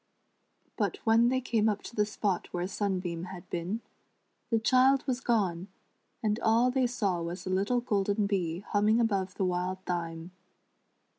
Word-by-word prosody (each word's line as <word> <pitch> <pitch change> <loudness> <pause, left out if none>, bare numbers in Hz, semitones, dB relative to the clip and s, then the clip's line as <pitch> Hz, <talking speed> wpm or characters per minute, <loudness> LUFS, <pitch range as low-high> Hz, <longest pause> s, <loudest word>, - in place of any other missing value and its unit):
But - - 0
when 230 +1 +5
they 260 +1 +1
came 225 -4 +1
up 205 -1 -2
to - - -9
the 210 -1 +2
spot 200 -4 -1
where 175 0 -2
Sunbeam 185 -4 -2
had 180 0 -9
been, 180 +7 -2 0.7
the 230 - +3
child 255 +4 +4
was 255 -2 -1
gone, 195 -8 0 0.6
and 215 +1 +1
all 235 +3 +3
they 260 -1 +2
saw 200 -8 -1
was 170 +2 -5
a 185 - -2
little 200 +6 +1
golden 205 -3 +1
bee 180 -4 -1
humming 210 +2 +2
above 195 -5 0
the 195 - 0
wild 180 +1 -1
thyme. 170 -1 -4
205 Hz, 160 wpm, -30 LUFS, 180-230 Hz, 0.7 s, when